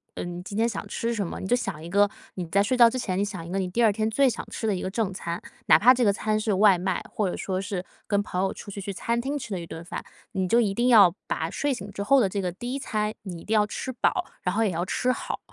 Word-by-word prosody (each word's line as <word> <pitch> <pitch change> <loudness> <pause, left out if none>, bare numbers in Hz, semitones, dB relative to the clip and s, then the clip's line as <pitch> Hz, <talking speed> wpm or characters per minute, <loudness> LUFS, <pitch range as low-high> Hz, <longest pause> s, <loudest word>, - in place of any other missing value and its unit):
嗯， 175 0 -5
今 200 +2 -6
天 225 +1 +3
想 235 - -4
吃 235 +1 -2
什 205 -5 -2
么， - - -6
你 - - -5
就 240 - +3
想 195 -11 -4
一 - - -7
个 205 +1 +4 0.3
你 180 - -3
在 200 +5 +3
睡 235 +5 +1
觉 240 -2 +8
之 255 - -4
前 190 -7 -2
你 - - +2
想 190 -5 -5
一 - - -7
个 195 - 0
你 185 - -1
第 235 +6 +1
2 215 -2 +5
天 215 +1 0
最 270 +5 +3
想 250 - -1
吃 - - -5
的 215 - +2
一 180 - -4
个 - - -2
正 200 -1 -1
餐。 170 -1 -4 0.3
哪 - - +8
怕 250 +4 +7
这 250 -1 +1
个 205 - +5
餐 215 +1 0
是 215 -1 0
外 200 0 +6
卖， 185 0 -1
或 210 -3 0
者 - - -4
说 190 -1 -2
是 195 -2 -4 0.2
跟 205 -2 +2
朋 185 -2 -2
友 195 - +1
出 200 - -9
去 200 - -6
去 200 - -4
餐 235 +5 -1
厅 275 +4 -2
吃 255 -6 -7
的 190 - -2
一 170 - -7
顿 165 +1 -8
饭， - - -5 0.3
你 190 -1 -1
就 230 +6 +4
一 210 -4 +2
定 240 +4 +1
要 205 -8 +7
把 - - -2
睡 290 -1 -1
醒 205 -6 -5
之 200 - -6
后 275 +7 +5
的 220 - +3
这 200 +1 -2
个 180 -1 -2
第 240 +8 -5
1 275 - -2
餐 215 -4 -1
你 175 -5 -7
一 - - -12
定 220 - -1
要 210 -1 +4
吃 260 - -4
饱， 355 +8 0 0.2
然 180 - -1
后 225 - +2
也 210 - +1
要 170 0 -1
吃 250 +7 0
好。 - - -4
205 Hz, 330 characters per minute, -26 LUFS, 185-230 Hz, 0.3 s, 觉